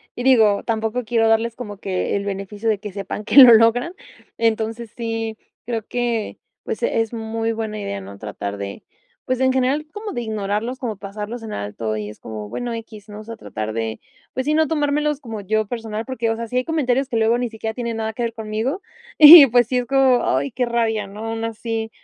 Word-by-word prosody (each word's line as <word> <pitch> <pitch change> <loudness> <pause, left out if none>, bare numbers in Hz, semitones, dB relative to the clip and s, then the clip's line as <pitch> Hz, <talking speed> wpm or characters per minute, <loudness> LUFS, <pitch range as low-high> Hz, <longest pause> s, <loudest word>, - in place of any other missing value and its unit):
y 245 - -5
digo, 220 -6 +4
tampoco 225 +2 -2
quiero 225 0 +1
darles 225 +1 +2
como 210 -5 -7
que 190 -2 -2
el 200 0 -2
beneficio 200 +2 -3
de 215 - +2
que 210 0 -7
sepan 200 +1 -5
que 280 - -1
lo 255 -3 +12
logran. 230 +8 +4 0.4
Entonces, 225 0 -1
sí 225 -1 -3 0.3
creo 230 -1 -2
que 240 -3 -2 0.3
pues, - - -5
es 225 - 0
muy 225 0 -2
buena 220 -1 -4
idea, 100 - -4
¿no?, 100 +1 -10
tratar 105 -1 -5
de 100 0 -7 0.4
pues, 255 -1 -1
en 260 0 +3
general 265 +4 0
como 420 0 -6
de 240 - -3
ignorarlos 215 +3 -3
como 225 -5 -4
pasarlos 210 +4 -7
en 220 - -6
alto 105 +2 -4
y 105 -1 -4
es 105 - -12
como 105 -2 -7
bueno 240 - -4
equis, 220 -2 -9
¿no?, 210 0 -8
o - - -11
sea, 230 +1 -9
tratar 110 - -5
de 110 0 -3 0.3
pues 260 - -2
sí 300 - +1
no 315 0 +3
tomármelos 295 -1 0
como 225 -5 -6
yo 215 +2 0
personal 225 0 -5
porque, 245 -3 -2
o 225 - 0
sea, 230 +1 -5
si 250 - -2
hay 255 - 0
comentarios 270 -5 0
que 245 - -5
luego 225 +2 +3
ni 245 -1 -2
siquiera 220 0 -5
tienen 235 -1 -4
nada 220 0 -2
que 240 - -6
ver 230 -1 -2
conmigo, 220 - -3 0.4
y 305 -1 +12
pues, 240 -1 +3
sí 250 - 0
es 245 - -3
como: 265 -1 +3
"Ay 135 +2 0
qué 250 - -1
rabia", 225 -3 0
¿no?, 210 +3 -8
aún 225 0 -3
así, 225 0 -4
225 Hz, 220 wpm, -21 LUFS, 210-245 Hz, 0.4 s, lo